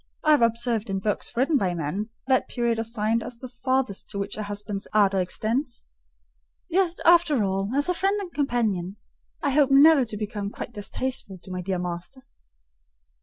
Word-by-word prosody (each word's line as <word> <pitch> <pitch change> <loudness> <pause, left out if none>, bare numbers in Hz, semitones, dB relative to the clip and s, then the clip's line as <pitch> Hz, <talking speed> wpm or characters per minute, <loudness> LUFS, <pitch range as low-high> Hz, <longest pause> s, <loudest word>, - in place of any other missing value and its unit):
I 310 - +4
have 295 - +5
observed 230 -1 +1
in 195 - -1
books 210 +4 -3
written 280 +4 +3
by 185 -7 0
men, 175 +7 -3 0.2
that 260 -1 +2
period 235 -2 -1
assigned 225 0 0
as 240 - -7
the 255 - -8
farthest 255 -4 -2
to 205 - -6
which 200 0 -3
a 215 - -4
husband's 205 -1 -5
ardour 200 -2 +4
extends. 235 +8 -2 0.8
Yet, 360 0 +1
after 335 -8 +5
all, 195 0 -1
as 285 +1 +2
a 360 - +2
friend 390 +3 +1
and 370 -4 -7
companion, 220 -10 -1 0.5
I 285 - +2
hope 285 0 +4
never 280 +1 +7
to 215 -2 -5
become 205 -1 -4
quite 225 - -8
distasteful 205 0 -3
to 185 +1 -12
my 180 0 -3
dear 185 +1 -2
master." 180 +9 -6
230 Hz, 175 wpm, -25 LUFS, 200-270 Hz, 0.8 s, never